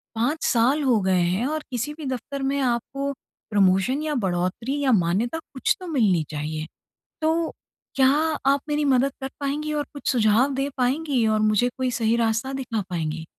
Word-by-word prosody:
5 260 +8 0
साल 255 +6 +3
हो 245 -5 +3
गए 185 -1 +2
हैं। 185 +8 +1
और 310 +1 -2
किसी 250 +5 -2
भी 305 -2 -8
दफ़्तर 265 +2 -4
में 275 +1 0
आपको 270 +3 -1 0.4
प्रमोशन 200 +7 +3
या 305 -2 -1
बढ़ोतरी 185 +10 -1
या 260 - +3
मान्यता 210 - +1
कुछ 260 - +1
तो 365 - -8
मिलनी 210 - +2
चाहिए। 155 +1 -4 0.6
तो 325 +1 +1 0.5
क्या 265 -1 +5 0.4
आप 280 - +1
मेरी 295 0 0
मदद 270 0 +3
कर 265 - -3
पाएँगी 295 +2 -2
और 295 -1 -1
कुछ 285 - -5
सुझाव 240 +4 +3
दे 275 +1 -1
पाएँगी 260 -1 +1
और 215 0 +2
मुझे 215 +3 +3
कोई 260 -1 0
सही 230 -1 +1
रास्ता 230 +3 0
दिखा 250 -5 -3
पाएँगी? 160 -2 -3
250 Hz, 175 wpm, -24 LUFS, 215-280 Hz, 0.6 s, क्या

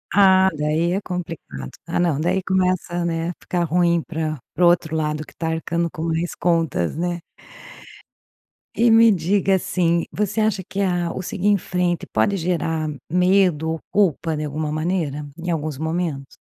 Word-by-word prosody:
Ah, 190 -1 +6
daí 155 +4 +1
é 195 - -1
complicado. 165 - -6 0.2
Ah, 170 - -2
não, 165 -5 +1
daí 185 +3 +1
começa, 185 -2 0
né, 165 0 -1
a - - -9
ficar 175 -1 -1
ruim 170 0 +2
para 155 -3 -3
para 175 - +3
o - - +8
outro 160 -2 +1
lado 150 -1 -1
que - - -16
está 165 -1 -3
arcando 170 +1 -1
com 160 - -7
mais 165 +1 -1
contas, 165 - 0
né? 175 0 -1 1.6
E 235 0 +4
me 225 0 +7
diga, 190 +2 +2
assim, 170 -2 +1
você 210 +1 -1
acha 210 -3 +1
que 195 +3 -4
a 175 -3 0
o - - -4
seguir 190 +2 -2
em 205 -1 +5
frente 180 -1 -1
pode 200 -2 +2
gerar 165 -2 -1 0.2
medo 180 -3 +3
ou 160 - -3
culpa 165 -5 +1
de 150 - -3
alguma 150 +1 -3
maneira? 155 -3 -2
Em 175 +1 -5
alguns 155 -4 -2
momentos? 160 -3 -3
170 Hz, 170 wpm, -22 LUFS, 160-185 Hz, 1.6 s, o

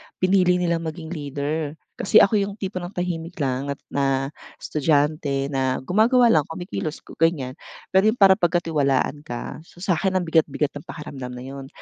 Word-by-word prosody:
pinili 185 -1 +3
nilang 170 -2 +1
maging 160 +1 -6
leader. 145 0 -3 0.2
Kasi 195 - +6
ako 205 +1 +3
'yong 200 0 -2
tipo 190 -3 -4
ng 175 +2 -8
tahimik 175 -1 -3
lang 135 -2 -1
at - - -32
na 135 0 0 0.2
estudyante 145 -2 0
na 130 -1 0
gumagawa 230 - +4
lang 150 -3 +3
kumikilos 165 -1 -5
ku - - -14
ganyan. 155 -6 +2 0.4
Pero 190 +3 +4
'yong 220 - +3
para 195 -2 +6
pagkatiwalaan 155 -5 +1
ka, 120 +4 -5
so, 175 - -13
sa'kin 190 +1 +1
ang 185 - +2
bigat-bigat 155 -3 +1
ng 145 - -10
pakiramdam 130 -5 -7
na 125 - -8
'yon. 135 0 -8
160 Hz, 170 wpm, -23 LUFS, 140-180 Hz, 0.4 s, Kasi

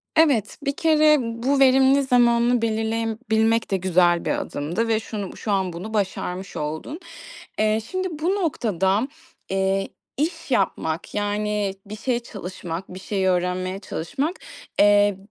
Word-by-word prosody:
Evet, 280 -10 +3
bir 280 - +1
kere 310 -1 +5
bu 235 +4 -1
verimli 270 +1 +5
zamanını 240 -2 +3
belirleyebilmek 225 0 0
de 195 - +2
güzel 175 -2 +3
bir - - +1
adımdı 170 +11 -2
ve 220 -1 +2
şunu 210 -3 -5
bu - - -13
şu 215 - -3
an 190 -3 0
bunu 200 +6 -7
başarmış 190 -2 -2
oldun. 155 - -4 0.6
Eee, 215 +1 +3
şimdi 370 0 -1
bu 350 +5 +1
noktada, 215 - 0 0.4
eee, 195 0 0 0.3
iş 325 0 -2
yapmak, 160 -8 -1
yani, 205 -1 -1
bir 205 +1 -7
şey 240 +2 0
çalışmak, 185 -5 -7
bir 185 - -7
şey 190 -1 -1
öğrenmeye 185 +1 0
çalışmak, 270 - -3 0.4
eee, 205 -1 +5
215 Hz, 135 wpm, -23 LUFS, 190-250 Hz, 0.6 s, kere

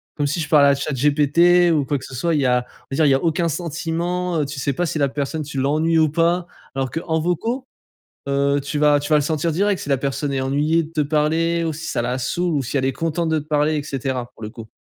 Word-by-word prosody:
Comme 145 -1 0
si 155 +4 -2
je 155 - -2
parlais 145 -2 +5
à 140 - +4
ChatGPT 150 +6 +3
ou 145 -3 +1
quoi 145 0 0
que 130 - -9
ce 135 - -11
soit. 165 +6 0
Il 145 - +1
y - - +1
a, 125 0 +2
on - - -24
va - - -2
dire, 155 - +4
il - - +4
y 135 - +5
a 135 - -2
aucun 165 +1 +1
sentiment. 170 +2 -2
Heu, - - 0
tu 140 0 -6
sais 140 - 0
pas 175 +6 -1
si 155 -1 -2
la 140 -1 +2
personne, 145 +3 -3
tu 140 -2 -5
l'ennuies 155 +4 +1
ou 160 -1 +4
pas. 170 +3 +1 0.3
Alors 135 -1 -2
qu'en 160 0 -1
vocaux, 225 - -2 0.6
heu, 140 +1 +1
tu 145 +2 -4
vas 150 -1 +5
tu 145 +2 -5
vas 150 - +6
le 145 - +2
sentir 160 +2 -1
direct 200 +3 +1
si - - -7
la 135 - +3
personne 140 +1 -2
est 135 - -1
ennuyée 150 +5 +1
de 155 - -9
te 155 - -1
parler 160 +3 +1
ou 160 - -1
si 160 +2 -7
ça - - -1
la 125 +2 -2
saoule 175 +6 -1
ou 140 - 0
si 130 - -3
elle 130 - +1
est 135 - +1
contente 165 +2 -2
de 160 -1 +1
te 150 - -7
parler 150 0 +1
et 145 - -1
cetera, 130 -3 -3
pour 115 - -15
le 105 - -5
coup. 110 0 -10
150 Hz, 285 wpm, -21 LUFS, 140-165 Hz, 0.6 s, vas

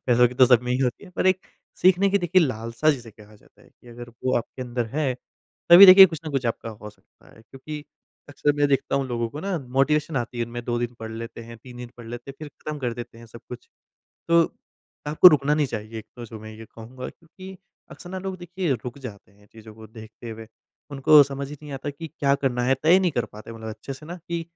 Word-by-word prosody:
पैसों 125 0 +5
की 125 - -11
तो 130 0 +6
सब 125 -1 +4
में 125 - -4
ही 125 - 0
होती 130 +8 -2
है, 180 - -14
पर 185 - -2
एक 185 0 +3 0.4
सीखने 190 +2 +5
की, 200 - +3
देखिए, 180 0 +3
लालसा 115 +3 0
जिसे 120 -5 -5
कहा 105 0 -18
जाता - - -25
है - - -21
कि 120 - -21
अगर 120 0 -10 0.2
वो 130 - +2
आपके 125 +2 -5
अंदर 120 -1 -3
है, 140 -5 0 0.6
तभी 190 +3 +11
देखिए, 190 +1 +11
कुछ 160 -4 -7
ना 155 - -5
कुछ 135 -3 -1
आपका 115 0 -3
हो 105 0 -10
सकता - - -25
है। 110 - -18
क्योंकि 145 +6 -9 0.4
अक्सर 145 0 0
मैं 145 0 +2
देखता 135 0 0
हूँ, 135 -1 -1
लोगों 120 -2 -2
को 150 - -7
ना 195 -1 -2 0.2
मोटिवेशन 150 +1 +1
आती 120 0 -3
है, 120 - 0
इनमें 120 +1 -7
2 120 0 -1
दिन 120 0 -3
पढ़ 110 0 -6
लेते 115 +1 -8
हैं, 115 0 -11
3 125 +1 -13
दिन 120 -1 -9
पढ़ 120 -1 -12
लेते 120 +3 -8
हैं, - - -12
फिर 155 -1 -8
खत्म 150 +2 -8
कर 125 -3 -2
देते 120 -1 -9
हैं 115 - -13
सब 115 +1 -13
कुछ। 125 0 -10 0.6
तो 170 0 +5 0.6
आपको 155 +4 +8
रुकना 150 -1 +2
नहीं 150 -2 +1
चाहिए, 110 -1 -6
एक 110 - -10
तो 120 - -8
जो 110 -1 -10
मैं 110 0 -10
ये 110 +1 -11
कहूँगा, 120 +4 -10
क्योंकि 185 +3 -13 0.3
अक्सर 175 - -11
ना, 190 - -5
लोग, 190 0 -5
देखिए, 175 -3 -3
रुक 125 +3 -7
जाते 100 -7 -11
हैं 105 +1 -24
चीज़ों 110 -1 -14
को 110 0 -13
देखते 110 +1 -11
हुए। 110 0 -10 0.4
उनको 145 +2 +6
समझ 140 0 -5
ही 150 - -8
नहीं 145 -2 -9
आता 135 +2 -5
कि 160 +3 -9
क्या 140 -1 +2
करना 130 -3 -1
है। 135 +1 +3
तय 170 +4 +6
नहीं 185 -3 +1
कर 120 - -1
पाते 110 +2 -12
मतलब 110 -1 -8
अच्छे 110 +5 -7
से 150 +3 -12
ना, 175 +2 -7
कि 170 0 -5
130 Hz, 250 wpm, -24 LUFS, 115-155 Hz, 0.6 s, तभी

